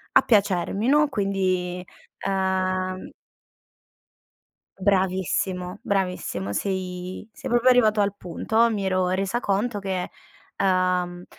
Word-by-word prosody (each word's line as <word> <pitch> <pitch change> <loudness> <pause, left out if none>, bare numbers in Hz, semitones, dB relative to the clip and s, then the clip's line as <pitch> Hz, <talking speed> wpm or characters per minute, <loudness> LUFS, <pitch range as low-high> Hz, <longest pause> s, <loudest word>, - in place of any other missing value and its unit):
a - - +8
piacermi, 200 0 +1
no? 295 +2 +4
Quindi, 185 -5 -1 0.3
ehm 185 -1 -1 1.7
Bravissimo, 185 -1 0
bravissimo, 180 - -2
sei 185 - -4
sei - - -7
proprio 240 +1 +4
arrivato 220 -4 +5
al 200 -1 +1
punto. 220 +6 +1
Mi 205 -3 -2
ero 185 -1 +1
resa 195 +6 -1
conto 205 +2 -1
che, 190 -2 -2 0.5
ehm, 180 -1 +1
190 Hz, 100 wpm, -24 LUFS, 185-205 Hz, 1.7 s, a